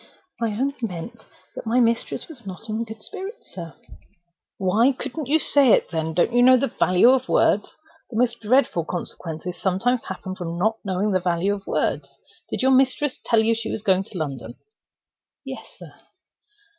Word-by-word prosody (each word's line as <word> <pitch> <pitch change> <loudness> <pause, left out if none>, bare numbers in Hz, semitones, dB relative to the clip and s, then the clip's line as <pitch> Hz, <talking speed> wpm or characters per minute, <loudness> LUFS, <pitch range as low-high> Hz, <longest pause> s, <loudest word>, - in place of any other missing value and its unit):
"I 230 - +2
only 270 +6 -1
meant 185 -2 -6 0.3
that - - -7
my 235 +3 +3
mistress 230 -1 0
was 290 -8 -12
not 195 +2 -9
in 220 +2 -2
good 220 -1 -10
spirits, 415 +4 -8
sir." 170 -3 -8 0.8
"Why 215 +8 +3
couldn't 275 +2 -5
you 300 +4 +4
say 280 -6 +5
it, - - +2
then? 160 -1 -2
Don't 180 +7 +2
you 245 - +4
know 255 +1 +7
the 255 -1 -1
value 185 +7 +5
of 260 -1 +1
words? 205 - +2 0.3
The 220 - -5
most 240 0 +1
dreadful 230 -6 +2
consequences 170 0 -5
sometimes 225 +6 0
happen 185 - -6
from 170 -2 -5
not 220 +5 +1
knowing 195 +1 -1
the 185 - +2
value 175 +2 0
of 200 -1 -8
words. - - -1 0.4
Did - - -3
your 265 - +4
mistress 265 +1 +2
tell 225 -1 +3
you 225 +1 +3
she 225 0 -3
was 210 - -4
going 190 -2 +3
to 190 - -9
London?" 130 -7 -5 0.9
"Yes, - - -7
sir." - - -12
220 Hz, 180 wpm, -23 LUFS, 180-250 Hz, 0.9 s, know